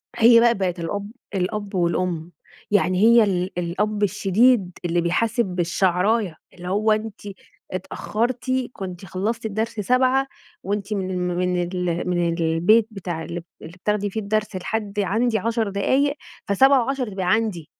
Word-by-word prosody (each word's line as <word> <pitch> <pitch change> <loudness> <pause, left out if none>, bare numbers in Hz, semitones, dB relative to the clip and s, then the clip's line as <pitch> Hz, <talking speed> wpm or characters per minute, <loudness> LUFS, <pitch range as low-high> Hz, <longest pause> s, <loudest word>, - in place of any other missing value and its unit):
هي 230 0 +7
بقى 235 0 +5
بقت 185 -3 -2
الأب 200 +5 -4 0.2
الأب 200 +2 -2
والأم. 175 -1 -1 0.4
يعني 185 -2 +2
هي 230 +1 +7
ال 185 -2 -1
الأب 205 +5 -1
الشديد 205 +1 +3
اللي 175 0 +1
بيحاسب 230 +8 +1
بالشعراية، 185 +2 0 0.2
اللي 180 0 -9
هو 210 +3 +1
أنتِ 215 -1 -2 0.5
اتأخرتِ، 235 +7 -2 0.2
كنتِ 185 -1 -7
خلصتِ 205 +5 -3
الدرس 220 +1 -2
7 255 +5 +2 0.4
وأنتِ 205 +1 -2
من 190 -2 -2
ال 185 - -2 0.2
من 180 0 0
ال 175 -1 -2
من 175 -1 0
البيت 170 +7 +3
بتاع 175 -5 -5
ال 170 +2 -6 0.2
اللي 160 - -10
بتاخدي 205 +2 -1
فيه 220 - -4
الدرس 210 0 -1
لحد 205 +2 -3
عندي 220 +4 +1
10 230 -2 -1
دقايق 265 +9 +1 0.3
ف07:10 265 +3 +3
تبقي 190 -2 -4
عندي. 215 -8 -1
200 Hz, 140 wpm, -23 LUFS, 180-225 Hz, 0.5 s, هي